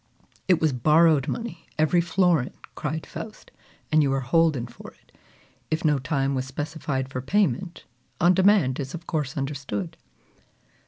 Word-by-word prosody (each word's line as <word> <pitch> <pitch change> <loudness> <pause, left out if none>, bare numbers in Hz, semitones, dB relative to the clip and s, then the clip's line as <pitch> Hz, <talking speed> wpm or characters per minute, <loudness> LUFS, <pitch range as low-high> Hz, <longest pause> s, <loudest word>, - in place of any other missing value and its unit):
"It 180 -3 +4
was 155 -3 +2
borrowed 150 +2 +4
money, 230 -8 -5
every 155 +3 +3
florin!" 175 -6 +2 0.2
cried 155 +2 -4
Faust, 215 -1 -9 0.4
"and 155 0 +5
you 140 -2 +2
are 135 - 0
holden 145 -1 +2
for 120 - -11
it. - - -30 0.5
If 160 +1 -1
no 150 -2 +3
time 135 0 -1
was 130 -1 -2
specified 140 -1 -3
for 130 -1 -5
payment, 185 +2 0 0.3
on 175 +1 +5
demand 185 -8 +3
is 135 +3 -4
of 170 0 -9
course 150 -4 -3
understood." 135 - -4
155 Hz, 150 wpm, -25 LUFS, 135-170 Hz, 0.5 s, and